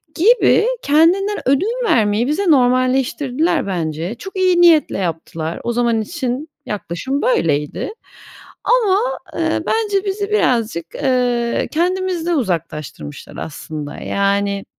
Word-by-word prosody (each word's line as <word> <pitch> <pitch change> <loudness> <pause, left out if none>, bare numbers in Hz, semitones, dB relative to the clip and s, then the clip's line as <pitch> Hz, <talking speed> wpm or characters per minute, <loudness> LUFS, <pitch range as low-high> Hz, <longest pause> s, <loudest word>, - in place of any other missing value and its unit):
gibi 440 +4 +4
kendinden 355 +8 +3
ödün 370 - +2
vermeyi 220 - +2
bize 305 +8 0
normalleştirdiler 255 - +2
bence. 170 +1 -3
Çok 385 +11 -10
iyi 365 -2 +3
niyetle 335 -3 +5
yaptılar. 165 -2 -4
O 235 - -1
zaman 235 -1 +1
için 270 +2 -4 0.2
yaklaşım 210 +7 -3
böyleydi 160 - 0 0.7
ama, 445 -6 +3 0.4
ııı, - - 0
bence 415 -3 0
bizi 400 +1 -2
birazcık, 230 - +1
ııı, 245 -3 0
kendimizden 350 0 0
uzaklaştırmışlar 160 - -4
aslında, 150 -1 -6
yani, 200 0 -1
255 Hz, 105 wpm, -18 LUFS, -, 0.7 s, niyetle